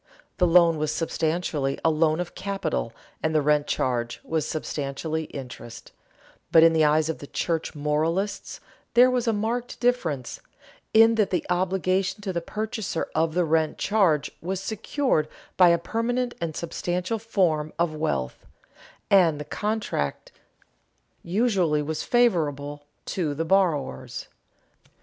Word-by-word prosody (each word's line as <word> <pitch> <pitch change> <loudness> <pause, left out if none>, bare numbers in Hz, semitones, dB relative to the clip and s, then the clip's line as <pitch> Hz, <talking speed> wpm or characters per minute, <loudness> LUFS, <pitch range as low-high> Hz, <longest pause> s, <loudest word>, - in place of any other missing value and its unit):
The 180 - +4
loan 170 -2 +5
was 155 0 0
substantially 155 -3 -1
a 165 - +5
loan 155 +1 +2
of 180 -1 -4
capital 195 - -3 0.3
and 160 0 0
the 155 - +4
rent 150 0 +2
charge 120 -2 -1
was 160 -1 -1
substantially 155 +1 -3
interest, 120 -4 -9 0.6
but 160 - +7
in 165 0 +6
the 160 -1 +3
eyes 155 +1 +3
of 160 - -3
the 145 - -9
church 165 +1 -2
moralists 160 +7 -1 0.4
there 250 +1 +7
was 250 -1 0
a - - +4
marked 230 +3 -2
difference, 170 - -1 0.5
in 225 +1 +6
that 200 - +1
the 180 -3 -1
obligation 185 +1 0
to 195 -2 -3
the 170 - -1
purchaser 215 -2 -3
of 160 0 0
the 180 -1 +2
rent 160 0 +1
charge 180 -9 +2
was 185 +2 -3
secured 220 - -1 0.3
by 180 -2 +7
a 170 - +4
permanent 240 +7 -1
and 160 -2 -3
substantial 180 +5 -2
form 175 -9 0
of 170 -2 +1
wealth, 150 - -3 0.6
and 170 -6 +5
the 150 - -5
contract 205 - -3 0.9
usually 180 -6 +1
was 155 +1 -3
favorable 145 - +1 0.2
to 155 -6 -2
the 165 +3 -2
borrowers. 160 - 0
165 Hz, 140 wpm, -25 LUFS, 150-195 Hz, 0.9 s, but